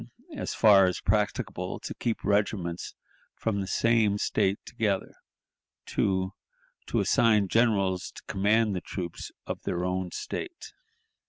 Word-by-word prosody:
As - - -4
far 100 -3 +7
as 90 - -1
practicable, 105 -2 -1
to - - -5
keep 115 -2 -2
regiments 100 -4 -1 0.4
from 100 -3 -1
the 95 - -4
same 110 -1 +2
State 100 -1 +1
together; 105 -6 -1 0.7
2. 95 0 0 0.5
To - - 0
assign 105 -4 +3
generals 100 -4 +2
to - - -10
command 105 +1 +2
the 90 - -2
troops 85 -3 -6
of - - -5
their 90 0 -2
own 90 0 -1
State. 360 - -6
100 Hz, 130 wpm, -28 LUFS, 95-110 Hz, 0.7 s, far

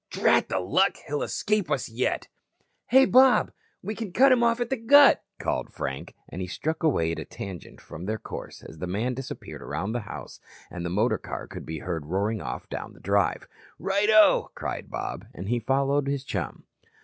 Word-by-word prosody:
"Drat - - +2
the 95 - 0
luck, 145 - +2
he'll 145 0 -2
escape 210 -4 0
us 140 -4 0
yet." 120 +2 -1 0.6
"Hey, 265 +2 +6
Bob, 260 0 +5 0.3
we 215 - -3
can 220 -3 -5
cut 265 +8 +5
'em 250 -2 +5
off 235 0 +3
at 240 0 -2
the - - +3
Gut," 275 +5 +6
called - - -2
Frank, 65 0 -5
and 90 - -7
he 90 - -3
struck 160 - -3
away 85 - +2
at 85 - -4
a - - -4
tangent 95 -4 -8
from 85 - -9
their 110 +1 -1
course - - -8
as 80 - -11
the 90 - -4
man 110 +8 -1
disappeared 135 +1 -7
around 100 - -3
the 120 - -1
house - - -8 0.3
and 85 - -6
the 85 - -2
motor 105 +7 +1
car - - -6
could - - -9
be 80 +1 -4
heard 80 -2 -4
roaring 100 +5 -1
off - - -5
down - - -6
the - - -17
drive. - - +1 0.3
"Righto," 210 +2 +4
cried - - -5
Bob, - - -5
and 95 +3 -6
he 120 0 +1
followed 135 +3 +1
his 140 -1 -1
chum. 95 - -4
130 Hz, 195 wpm, -26 LUFS, -, 0.6 s, Hey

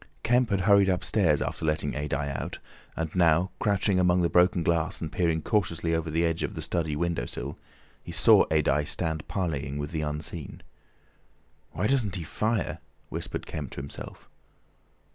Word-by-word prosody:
Kemp 120 0 +3
had 100 -2 +1
hurried 100 0 +5
upstairs 90 -4 +2
after - - -5
letting 75 -2 0
Adye 70 -1 -2
out, - - -4 0.4
and 80 -1 -3
now 85 +1 +3
crouching 100 -2 +2
among 90 0 +3
the 85 - +1
broken 90 0 +4
glass 85 -1 +1
and 80 -1 -5
peering 80 -3 0
cautiously 85 -6 0
over 80 0 -1
the 80 +2 +1
edge 80 0 0
of - - -3
the - - -4
study 80 -4 -1
window 85 -6 -1
sill, - - -6 0.4
he - - -8
saw - - +6
Adye 75 -2 +2
stand 80 -2 -2
parleying 75 -7 -2
with 75 0 -4
the 80 -2 -2
Unseen. 75 0 -5 1.1
"Why 90 - -1
doesn't 110 -5 +1
he 90 - -3
fire?" 110 +6 -1 0.3
whispered - - -4
Kemp 70 -4 -5
to - - -5
himself. 70 - -9
85 Hz, 165 wpm, -27 LUFS, 75-95 Hz, 1.1 s, saw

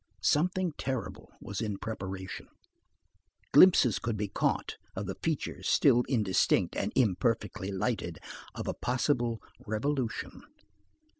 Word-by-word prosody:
Something 180 - +2
terrible 130 -3 -4
was 100 +2 -5
in 105 -3 -2
preparation. 95 -4 -6 1.0
Glimpses 125 - +7
could 115 +1 -2
be 105 0 -1
caught - - -1 0.2
of 95 - -3
the 95 - -3
features 160 -3 -2
still 125 -4 +5
indistinct 105 -8 +2
and - - -1
imperfectly 105 -3 +1
lighted, 95 -4 -2 0.4
of - - -5
a - - 0
possible 120 -2 0 0.2
revolution. 120 +3 -2
115 Hz, 115 wpm, -30 LUFS, 100-130 Hz, 1.0 s, Glimpses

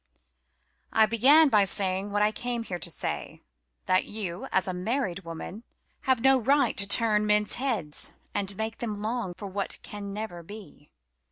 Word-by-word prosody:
I 220 - +5
began 270 +8 +6
by 210 -5 +5
saying 195 0 +2
what 205 +1 +1
I 210 - +3
came 240 +1 -3
here 180 -5 -5
to 170 - -2
say: - - -3 0.4
that 185 0 +2
you, 210 +2 -5
as 190 - +2
a 185 - -2
married 195 0 -2
woman, 170 +6 -8 0.4
have 260 -3 +2
no 265 +1 +5
right 280 +4 +2
to 200 - +1
turn 210 0 +3
men's 210 0 +3
heads 210 - -2 0.2
and 195 -1 -3
make 220 0 -3
them 220 -3 -3
long 215 -3 -3
for 205 - -7
what 195 +1 -2
can 205 -1 -7
never 200 -4 -6
be." 200 -4 -12
210 Hz, 170 wpm, -27 LUFS, 190-230 Hz, 0.4 s, began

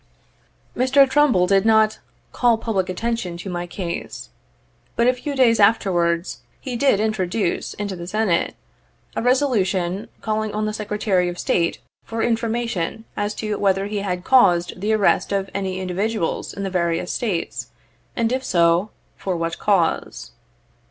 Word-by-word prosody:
Mr. 270 +2 +5
Trumbull 265 -10 +3
did 195 +1 +3
not 220 -1 +3 0.3
"call 240 -2 +3
public 200 -5 -1
attention 190 -3 -2
to 185 +2 -6
my 175 0 -4
case 175 -1 -6 0.3
;" - - -39
but 235 - +2
a 250 - +5
few 280 +3 -5
days 240 -4 +4
afterwards 180 -5 +2 0.2
he 255 -3 -5
did 240 -4 +3
introduce 210 -3 -1
in 205 - -4
the 175 -3 -6
Senate 205 -3 0 0.6
a - - -1
resolution 210 -8 +1
calling 215 -1 -2
on 215 0 0
the 215 - -2
Secretary 205 -4 0
of 175 - -6
State 170 -1 0 0.2
for 225 0 -3
informa 230 0 0
tion 220 +2 -3
as 205 0 -2
to 215 -1 -3
whether 195 -1 +2
he 205 +1 -3
had 180 -3 -3
caused 180 -8 +3
the 210 +2 0
arrest 215 -2 +2
of 195 -1 -1
any 190 -1 -2
indi 185 -1 -4
viduals 210 -1 -1
in 200 - -6
the 195 - -3
various 170 -1 0
States, 200 -8 -2 0.5
and 230 -1 0
if 260 +1 -1
so, 170 -1 +2 0.3
for 185 -3 -3
what 165 0 -3
cause. 190 -6 0
205 Hz, 160 wpm, -22 LUFS, 180-225 Hz, 0.6 s, Mr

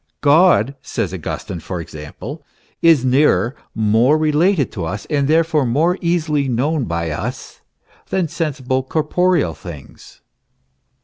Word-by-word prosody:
"God," 145 - +4
says - - -3
Augustine, 85 - -5
for 90 +2 -5
example, 75 -3 -8 0.4
"is 160 -6 +5
nearer, 130 -1 +3 0.2
more 110 +7 +3
related 155 +1 +2
to 95 - -5
us, 100 +6 -4
and 140 -2 +1
therefore 160 -1 +2
more 155 +10 +1
easily 155 -5 0
known 135 +4 0
by 85 -3 -2
us, - - -6 0.5
than 185 -3 0
sensible, 140 -5 -2
corporeal 155 - +1
things." 80 -5 -12
140 Hz, 120 wpm, -19 LUFS, 110-160 Hz, 0.5 s, is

